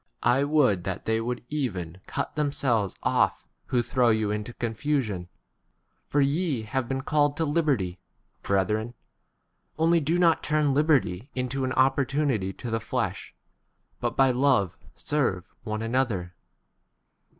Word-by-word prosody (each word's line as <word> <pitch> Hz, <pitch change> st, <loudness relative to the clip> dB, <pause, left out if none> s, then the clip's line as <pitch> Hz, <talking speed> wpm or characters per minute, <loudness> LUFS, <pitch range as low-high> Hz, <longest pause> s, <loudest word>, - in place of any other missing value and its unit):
I 125 Hz, +4 st, +3 dB
would 135 Hz, -, +3 dB
that 95 Hz, -1 st, -4 dB
they 110 Hz, 0 st, +1 dB
would 120 Hz, +1 st, -3 dB
even 95 Hz, -, -3 dB
cut -, -, -2 dB
k 150 Hz, -, -1 dB
themselves 120 Hz, -, 0 dB
off -, -, +1 dB, 0.2 s
who 120 Hz, -2 st, +1 dB
throw 125 Hz, 0 st, +2 dB
you 110 Hz, -2 st, +2 dB
13 105 Hz, -, 0 dB
into 105 Hz, +3 st, -5 dB
confusion. 115 Hz, -6 st, -2 dB, 0.8 s
For 145 Hz, -, +2 dB
ye 140 Hz, -3 st, +1 dB
have 120 Hz, +3 st, -2 dB
been 135 Hz, 0 st, -1 dB
called 145 Hz, 0 st, +1 dB
to 165 Hz, -, +1 dB
l 150 Hz, -, -1 dB
liberty, 130 Hz, -, 0 dB, 0.4 s
brethren; 105 Hz, +4 st, 0 dB, 0.8 s
only 165 Hz, +1 st, +4 dB
[do] 160 Hz, +3 st, +1 dB
not 170 Hz, -2 st, +4 dB
[turn] 150 Hz, -2 st, +1 dB
liberty 140 Hz, -, +2 dB
into 130 Hz, +1 st, -2 dB
an 130 Hz, -, -1 dB
opportunity 135 Hz, -5 st, +1 dB
to 115 Hz, +4 st, -7 dB
the 115 Hz, -, 0 dB
flesh, 110 Hz, -, -3 dB, 0.6 s
but -, -, -2 dB
by 135 Hz, -1 st, +5 dB
14 125 Hz, +1 st, -2 dB
love 125 Hz, -11 st, +3 dB, 0.2 s
serve 120 Hz, -, 0 dB, 0.2 s
one 110 Hz, 0 st, -4 dB
another. 115 Hz, -7 st, -1 dB
125 Hz, 150 wpm, -26 LUFS, 110-145 Hz, 0.8 s, by